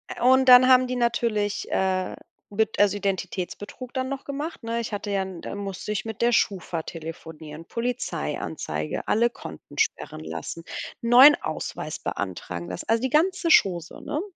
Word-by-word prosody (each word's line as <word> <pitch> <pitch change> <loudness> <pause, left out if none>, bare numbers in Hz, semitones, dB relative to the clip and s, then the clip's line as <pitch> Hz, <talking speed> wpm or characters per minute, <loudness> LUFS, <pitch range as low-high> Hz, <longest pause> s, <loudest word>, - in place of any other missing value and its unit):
Ä - - -10
und 260 +1 +5
dann 250 0 +9
haben 255 -1 +6
die 255 - -2
natürlich, 230 -4 0
äh, 185 -1 0 0.3
Bet 220 +1 -1
also, 205 0 +4
Identitätsbetrug 200 +4 -4
dann 260 -1 -1
noch 275 0 -5
gemacht, 290 +1 -5
ne? 230 +1 -2
Ich 230 -2 -4
hatte 205 0 -3
ja 195 -1 +1
'n 185 -3 -8
da - - -6
musste 200 0 -5
ich 205 -2 -2
mit 220 -2 -6
der 240 +1 +4
Schufa 180 -6 0
telefonieren, 160 -1 -9
Polizeianzeige, 160 - -3
alle 235 +3 +3
Konten 80 - -11
sperren 80 - -1
lassen, 80 - -6 0.4
neuen 250 +5 +8
Ausweis 155 0 -5
beantragen, 90 -3 -5
das 90 - -6
also, 225 0 +2
die 260 - 0
ganze 340 +5 +2
Chose, 175 - +3
ne? 300 +1 -3
205 Hz, 165 wpm, -25 LUFS, 170-250 Hz, 0.4 s, dann